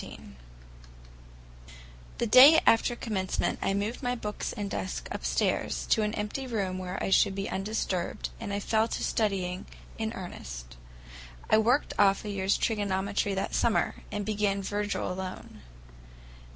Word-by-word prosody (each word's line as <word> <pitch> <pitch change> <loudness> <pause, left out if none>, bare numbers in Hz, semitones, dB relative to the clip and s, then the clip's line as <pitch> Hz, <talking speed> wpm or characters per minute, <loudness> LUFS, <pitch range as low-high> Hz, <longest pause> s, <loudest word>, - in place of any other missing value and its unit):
XIV - - -9 2.0
THE - - 0
day 265 +8 +9
after 230 +1 +4
Commencement 195 -6 -2
I 195 - 0
moved 210 +6 -2
my 245 -1 -1
books 210 -3 -4
and 205 -1 -4
desk 190 -1 -4
upstairs, - - -1
to 220 - +4
an 210 0 -1
empty 210 +6 -3
room 195 -6 -2
where 185 0 -5
I - - -1
should 195 0 +4
be 195 0 -3
undisturbed, 195 -3 -2
and 220 -3 -5
I 200 - -1
fell 220 +2 +1
to - - -4
studying 190 -4 -1 0.3
in 220 0 -1
earnest. - - -8 0.8
I 215 - +6
worked 245 +6 +2
off 200 0 +4
a 210 - -3
year's 195 0 +1
trigonometry 200 -2 0
that 190 - -2
summer, 230 - +1
and 205 -1 -3
began 205 -2 0
Virgil 205 -1 -2
alone. 185 0 -7
205 Hz, 145 wpm, -28 LUFS, 190-220 Hz, 2.0 s, day